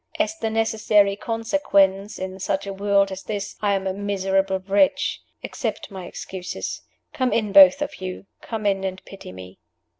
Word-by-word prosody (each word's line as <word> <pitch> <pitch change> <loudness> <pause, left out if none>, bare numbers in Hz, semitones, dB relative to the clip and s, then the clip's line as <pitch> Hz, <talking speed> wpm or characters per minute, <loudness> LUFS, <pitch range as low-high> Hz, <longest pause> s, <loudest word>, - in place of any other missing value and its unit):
As 325 - 0
the 225 -9 -2
necessary 215 -2 +2
consequence 210 -4 +1
(in 190 0 -6
such 195 +1 -2
a 200 - -5
world 200 0 +2
as 190 0 -6
this), 205 -1 -5
I 205 -1 +2
am 195 0 -3
a 190 - -1
miserable 195 -1 0
wretch. 200 +8 +1 0.2
Accept - - -4
my 185 -2 -7
excuses. 185 -1 -6 0.3
Come 255 -2 0
in, 215 -3 0
both 195 -2 +8
of - - -7
you. 185 +1 -6 0.2
Come 220 -2 -5
in 195 -1 +1
and 190 0 -5
pity 195 - -10
me." 95 0 -11
195 Hz, 170 wpm, -23 LUFS, 190-210 Hz, 0.3 s, both